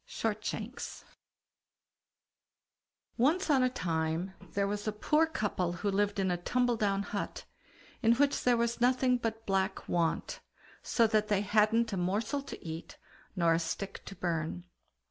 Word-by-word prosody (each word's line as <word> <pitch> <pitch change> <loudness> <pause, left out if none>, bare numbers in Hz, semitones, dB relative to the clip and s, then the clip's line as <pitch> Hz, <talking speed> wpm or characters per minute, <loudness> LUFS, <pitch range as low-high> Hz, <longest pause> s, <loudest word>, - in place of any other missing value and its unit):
SHORTSHANKS 220 +2 -4 2.1
Once 310 +7 +3
on 270 -2 +5
a 255 - +4
time, 165 -3 -1 0.2
there 200 0 +1
was 205 +1 -3
a - - +2
poor 300 +9 +2
couple 205 - -1
who 200 +3 -1
lived 205 +1 +1
in 190 -2 +1
a 175 - 0
tumble 245 +7 +1
down 200 -2 +1
hut, 205 0 -4 0.6
in 230 -1 +5
which 285 +2 +2
there 245 -1 +4
was 235 0 0
nothing 250 0 +3
but 225 -1 -3
black 195 0 0
want, 170 -2 0 0.4
so 230 - +3
that 215 -1 +2
they 205 -2 +2
hadn't 215 +2 +3
a - - -1
morsel 210 +10 0
to 275 - -9
eat, 160 0 -7 0.4
nor 170 -3 +3
a 165 - +2
stick 195 +4 -4
to 195 - -8
burn. 170 -1 -2
210 Hz, 150 wpm, -31 LUFS, 185-235 Hz, 2.1 s, on